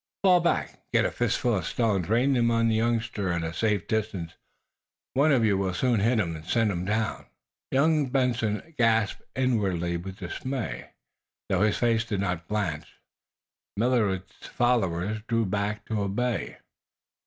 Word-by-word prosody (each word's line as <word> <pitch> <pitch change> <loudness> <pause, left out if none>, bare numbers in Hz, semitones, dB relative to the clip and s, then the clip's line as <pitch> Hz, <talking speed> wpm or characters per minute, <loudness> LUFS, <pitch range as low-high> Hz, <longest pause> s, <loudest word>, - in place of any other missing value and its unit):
"Fall 185 -2 +6
back 170 0 +1
and - - -25
get - - +4
a - - 0
fistful 120 -3 0
of 90 - -3
stones. 100 -7 0
Rain 125 +5 +3
them 120 -2 +3
in 115 - +2
on 115 0 +3
the - - +2
youngster 110 -4 0
at 85 -1 -1
a 80 0 -3
safe 105 -2 0
distance. 100 -6 -2 0.8
One 145 +4 +4
of 125 -5 +4
you 100 -3 +2
will 95 -2 -1
soon 120 +1 +2
hit 115 +4 +2
him 85 -5 -1
and 80 - -9
send 110 +5 +1
him 90 -1 -3
down!" 110 +2 -1 0.4
Young 150 0 +2
Benson 125 +1 0
gasped 115 -3 +2
inwardly 95 -10 0
with 95 +3 -8
dismay, 125 +7 -5 0.6
though - - +1
his 105 0 +2
face 115 -2 +2
did 105 -3 -3
not 90 -3 -2
blanch. 95 -8 -3 0.8
Millard's 105 -5 0
followers 110 -4 0
drew 115 -2 +1
back 105 +2 -2
to 110 -2 -2
obey. 105 +3 -2
110 Hz, 165 wpm, -27 LUFS, 95-120 Hz, 0.8 s, Fall